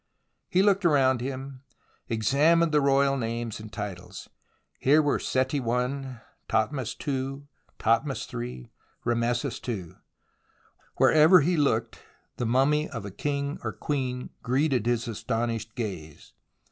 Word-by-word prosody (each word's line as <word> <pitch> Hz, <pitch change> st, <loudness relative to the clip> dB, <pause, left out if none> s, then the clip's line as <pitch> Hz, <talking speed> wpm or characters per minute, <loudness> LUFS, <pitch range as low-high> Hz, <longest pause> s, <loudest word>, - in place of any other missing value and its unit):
He 185 Hz, +1 st, +3 dB
looked 200 Hz, -1 st, +3 dB
around 135 Hz, -6 st, +3 dB
him, 135 Hz, 0 st, -6 dB, 0.5 s
examined 145 Hz, +9 st, +3 dB
the 150 Hz, -1 st, +3 dB
royal 140 Hz, 0 st, +3 dB
names 115 Hz, -2 st, -3 dB
and 110 Hz, 0 st, -10 dB
titles. 95 Hz, -4 st, -7 dB, 0.5 s
Here 145 Hz, +4 st, +5 dB
were 145 Hz, -2 st, +2 dB
Seti 130 Hz, +2 st, 0 dB
i, 125 Hz, +1 st, -2 dB, 0.3 s
Thothmes 115 Hz, +3 st, -1 dB
ii, 135 Hz, 0 st, -2 dB, 0.3 s
Thothmes -, -, 0 dB
iii, 60 Hz, +1 st, -6 dB, 0.3 s
Rameses 120 Hz, 0 st, 0 dB
ii. 95 Hz, -8 st, -4 dB, 1.0 s
Wherever 160 Hz, +3 st, +6 dB
he 175 Hz, +5 st, +1 dB
looked 115 Hz, -7 st, 0 dB, 0.4 s
the 120 Hz, -, -1 dB
mummy 145 Hz, +6 st, +2 dB
of 115 Hz, -3 st, -6 dB
a 100 Hz, -, -6 dB
king 140 Hz, +5 st, -3 dB
or -, -, -2 dB
queen 130 Hz, -4 st, -3 dB
greeted 130 Hz, -3 st, +1 dB
his 120 Hz, -1 st, 0 dB
astonished 115 Hz, 0 st, -3 dB
gaze. 90 Hz, -10 st, -6 dB
130 Hz, 120 wpm, -27 LUFS, 115-140 Hz, 1.0 s, Wherever